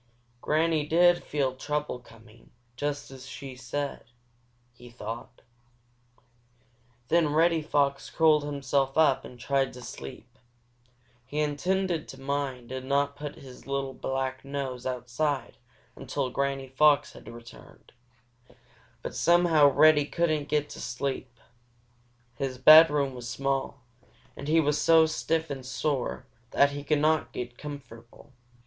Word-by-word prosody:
"Granny 160 0 +1
did 175 +3 +4
feel 135 -3 -1
trouble 150 -1 -3
coming, 115 -1 -18 0.3
just 145 +1 -4
as 130 -1 -11
she 135 -1 -8
said," 140 +3 -5 0.7
he 120 0 -14
thought. 115 +1 -8 1.7
Then 170 -2 +3
Reddy 165 +1 +3
Fox 140 -2 0
curled 155 -2 +3
himself 140 -1 -1
up 150 -4 +4
and 125 - -12
tried 135 +1 0
to 125 - -10
sleep. 120 - -10 0.8
He 145 +4 -5
intended 170 +4 -1
to 135 - -11
mind 135 -3 -3
and 130 0 -6
not 140 0 +1
put 145 0 -7
his 130 -1 -13
little 135 -1 -2
black 130 0 -3
nose 135 -3 -4
outside 125 +2 -2 0.4
until 135 +1 -3
old 125 -1 -4
Granny 135 -1 -2
Fox 145 +2 +3
returned. 115 0 -13 1.1
But - - -5
somehow 170 -4 +4
Reddy 150 +1 +5
couldn't 155 -2 -1
get 150 -1 +1
to - - -8
sleep. 130 -1 -4 1.0
His 135 -3 -3
bedroom 150 0 +7
was 120 -1 -7
small, 135 +2 -2 0.5
and 140 - -8
he 160 +2 +4
was 150 -1 +1
so 160 +1 +6
stiff 160 0 -1
and 135 -2 -5
sore 130 0 -2 0.2
that 140 0 +3
he 145 0 -6
could 150 +1 +1
not 155 +1 +1
get 120 0 -6
comfortable. 135 -3 -11
140 Hz, 130 wpm, -27 LUFS, 130-150 Hz, 1.7 s, bedroom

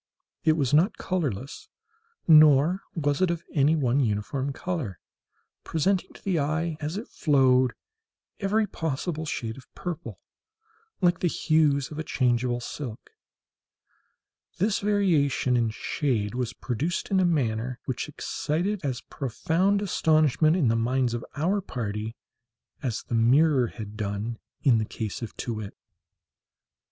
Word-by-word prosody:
It 160 - +5
was 145 -4 0
not 170 +8 +4
colourless, 140 - -3 0.6
nor 155 +3 +6
was 145 -1 0
it 185 - +3
of 170 -1 -2
any 150 +1 +4
one 135 -3 +2
uniform 130 +4 -1
colour—presenting 165 - -4
to - - -16
the 185 -4 +1
eye, 155 +3 -1
as 155 +5 -3
it 220 - -6
flowed, 130 -4 +3 0.7
every 215 +2 +2
possible 160 -2 -3
shade 115 -5 -3
of 130 - -19
purple; 175 -3 -6 0.8
like 175 -1 +3
the 180 - +1
hues 150 -4 +2
of 150 - -6
a - - -2
changeable 120 -3 +1
silk. 125 - -7 1.5
This 200 +3 +1
variation 170 -11 +2
in 115 -2 +2
shade 110 -2 -1
was 125 -1 -2
produced 140 - -3
in 190 - +4
a - - +4
manner 125 -7 0
which 130 +2 -3
excited 175 +7 -2
as 130 -3 -2
profound 170 - 0
astonishment 155 -4 +3
in 165 -9 +2
the 115 - +3
minds 120 +1 +1
of 120 - -3
our 180 +8 +1
party 110 - -4 0.7
as 120 -5 -2
the - - -7
mirror 130 +3 +4
had 105 -2 -8
done 105 +2 -3 0.2
in 120 -5 +5
the 110 - -1
case 110 0 -5
of 115 - -7
Too 120 - -3
wit. 110 -2 -7
140 Hz, 135 wpm, -26 LUFS, 120-165 Hz, 1.5 s, nor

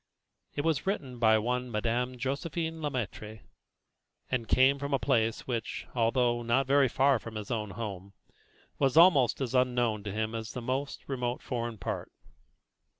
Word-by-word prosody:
It 145 - -1
was 160 +2 0
written 135 - -2
by 110 -1 +5
one 125 +3 -1
Madame 120 +3 -1
Josephine 160 +5 -3
Le 150 - -1
Maître, 110 -4 -5 0.9
and 120 -3 -1
came 135 +4 +4
from 140 0 -1
a - - +2
place 115 -3 +1
which, 115 -4 -3
although 120 0 +2
not 120 +3 +2
very 140 +1 +4
far 135 +1 +3
from 115 0 -9
his 105 0 -5
own 110 -3 -2
home, 100 -2 -6 0.7
was 135 +1 +2
almost 155 -8 +6
as 130 -2 -2
unknown 125 -4 +2
to 100 - -3
him 110 +2 -2
as 110 -1 -5
the - - -4
most 130 +3 -3
remote 125 -2 -2
foreign 120 -2 -3
part. 95 - -4
125 Hz, 160 wpm, -30 LUFS, 115-135 Hz, 0.9 s, almost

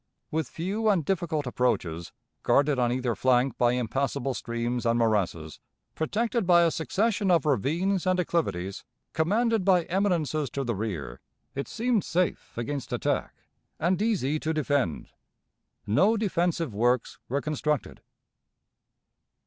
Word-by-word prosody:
With 160 0 -1
few 205 +6 -1
and 180 -8 +2
difficult 165 -5 -1
approaches, 90 -10 -1 0.3
guarded 145 -1 +3
on 120 -1 +2
either 125 -1 0
flank 125 +2 +2
by 120 0 +4
impassable 135 +2 -1
streams 120 0 -3
and 115 0 +2
morasses, 100 -9 0 0.3
protected 225 +5 -1
by 175 -1 +6
a 165 - +3
succession 205 +5 0
of 170 -4 +3
ravines 170 - +1
and 185 0 +2
acclivities, 100 - -1 0.3
commanded 220 +6 +1
by 180 -2 +4
eminences 165 -6 0
to 140 +4 -3
the 120 -2 -1
rear, 90 - -4 0.3
it 140 - -4
seemed 230 -2 0
safe 180 -6 -1
against 135 +3 -4
attack, - - -1 0.4
and 180 +4 +1
easy 170 - +1
to 160 +1 -2
defend. 145 - -1 0.7
No 190 - +3
defensive 175 - 0
works 120 +3 +1
were 140 +3 0
constructed. 150 -1 -2
150 Hz, 130 wpm, -27 LUFS, 120-180 Hz, 0.7 s, by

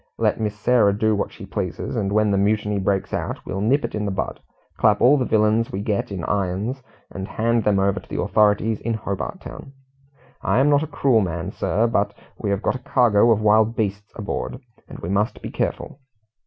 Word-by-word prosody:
Let - - +1
Miss 105 -1 -2
Sarah 105 -5 +3
do 110 0 +2
what 100 - -2
she - - -10
pleases, - - -4
and 100 - -1
when 105 0 +2
the 100 - +2
mutiny 105 0 +1
breaks 95 0 -1
out, - - -2
we - - -5
will 95 - -2
nip 130 +8 +2
it - - -6
in 105 - -2
the - - -1
bud; 95 - -3 0.4
clap - - +3
all 130 +4 +6
the 130 -3 0
villains 110 +1 +2
we 95 - -3
get 105 -1 -2
in 95 -4 -4
irons, 100 +8 -2 0.3
and 95 0 -6
hand 115 +1 0
them 105 -2 +3
over 95 0 +1
to - - -18
the - - -4
authorities 105 +1 +2
in 115 0 -1
Hobart 100 -3 -4
Town. 135 - -10 0.7
I - - +1
am 140 +3 +4
not 145 0 +4
a 160 - -3
cruel 130 -6 +2
man, 85 -3 -3
sir, 105 +7 0
but 115 - 0 0.2
we - - -4
have 100 +2 -1
got - - +1
a 130 - -5
cargo 120 -3 +3
of 110 -2 +3
wild 110 +2 +4
beasts 105 0 -3
aboard, 110 +3 -4 0.3
and - - -9
we 85 - -6
must 100 +3 0
be - - -7
careful." 135 - -3
105 Hz, 220 wpm, -22 LUFS, 100-115 Hz, 0.7 s, all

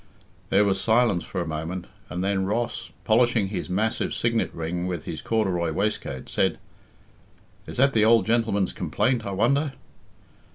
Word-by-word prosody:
There 100 +2 +4
was 95 -1 +1
silence 110 -5 +3
for 95 - -4
a 85 - -3
moment, 80 +3 -4 0.2
and 90 +1 -3
then 95 -1 +1
Ross, 110 +4 -2
polishing 115 -3 +3
his 100 - -4
massive 105 +5 0
signet 115 -1 0
ring 85 +2 -3
on 90 - -3
his 80 - -6
corduroy 95 -7 0
waistcoat, 75 -8 -2
said, - - +1 1.1
"Is - - -7
that 135 +2 +4
the 110 - +4
old 115 +1 +5
gentleman's 110 -4 +1
complaint, 125 -5 0
I - - -3
wonder?" 140 +9 +1
100 Hz, 155 wpm, -25 LUFS, 90-115 Hz, 1.1 s, old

